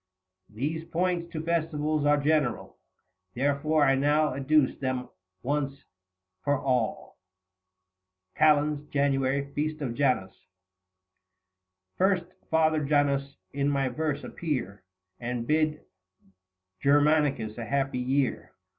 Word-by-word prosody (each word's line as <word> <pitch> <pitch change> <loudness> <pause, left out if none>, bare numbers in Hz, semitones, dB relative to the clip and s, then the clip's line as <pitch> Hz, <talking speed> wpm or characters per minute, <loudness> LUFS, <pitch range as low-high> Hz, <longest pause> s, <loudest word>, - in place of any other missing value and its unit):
These 150 +9 -3
points 170 0 -1
to 160 -2 -4
Festivals 155 -3 0
are 145 0 +5
general 145 -4 0 0.6
Therefore 145 +3 +2
I 135 - +4
now 145 +2 +2
adduce 140 +1 +2
them 130 -2 -2 0.3
once 140 0 -2 0.6
for 145 0 +2
all. 125 -5 -2 1.2
KAL. 150 0 +4
JAN. 140 0 0
FEAST 155 +1 -2
OF 130 -5 -3
JANUS. 125 -8 0 1.6
First, 190 -2 +2 0.2
Father 155 -1 +2
Janus, 140 -1 +1 0.2
in 140 0 0
my 135 -2 +1
verse 150 +3 -2
appear 120 - -4 0.4
70 120 - -4
And 120 -1 -3
bid 155 0 +1 1.0
Germanicus 145 -6 +2
a 115 - -4
happy 135 -1 -1
year. 130 +1 -1
145 Hz, 105 wpm, -27 LUFS, 135-155 Hz, 1.6 s, are